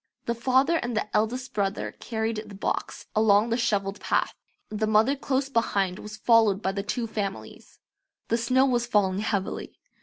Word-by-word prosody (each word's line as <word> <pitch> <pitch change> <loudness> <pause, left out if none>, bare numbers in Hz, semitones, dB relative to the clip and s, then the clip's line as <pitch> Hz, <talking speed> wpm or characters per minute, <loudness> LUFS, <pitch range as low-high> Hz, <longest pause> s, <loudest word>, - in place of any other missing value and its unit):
The 235 - 0
father 260 +7 +2
and 240 -6 -3
the 215 - -2
eldest 245 +4 0
brother 200 -1 -1
carried 220 -1 -3
the 200 - -10
box 195 - -3
along 215 +1 +4
the - - +3
shovelled 205 -4 0
path. - - 0 0.4
The 215 0 -1
mother 220 +6 +4
close 270 0 -1
behind 200 -7 0
was 215 +1 -8
followed 220 -3 +4
by 190 -2 -1
the 200 +1 -3
two 220 +4 -2
families. 205 -3 -6 0.5
The 230 - +2
snow 255 +3 +3
was 240 -2 +1
falling 195 -4 +2
heavily. 205 -3 -3
220 Hz, 170 wpm, -26 LUFS, 205-240 Hz, 0.5 s, along